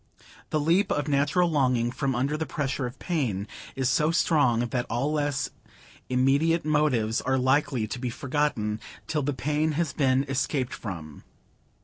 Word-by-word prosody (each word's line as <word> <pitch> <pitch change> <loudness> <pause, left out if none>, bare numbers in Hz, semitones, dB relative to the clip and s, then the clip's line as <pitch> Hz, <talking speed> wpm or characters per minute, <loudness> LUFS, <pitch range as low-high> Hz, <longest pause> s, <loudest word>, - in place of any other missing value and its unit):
The 155 - +1
leap 170 +7 +2
of 145 0 0
natural 145 +5 +2
longing 125 -6 +2
from 135 0 -1
under 135 +5 0
the 160 +1 -3
pressure 135 -3 -2
of 125 - -9
pain 120 - -2 0.3
is 130 -1 0
so 150 +5 +2
strong, 145 -9 +3
that 125 -1 -2
all 135 +6 0
less 145 -2 -1 0.6
immediate 140 +6 +2
motives 140 -8 +2
are 130 +1 +1
likely 130 -2 +2
to 120 +4 -5
be 125 0 -2
forgotten—till 140 +1 -2
the 145 +1 -1
pain 150 +4 0
has 160 -1 -1
been 135 -2 +2
escaped 135 -1 -1
from. 80 -8 -7
140 Hz, 150 wpm, -27 LUFS, 125-150 Hz, 0.6 s, strong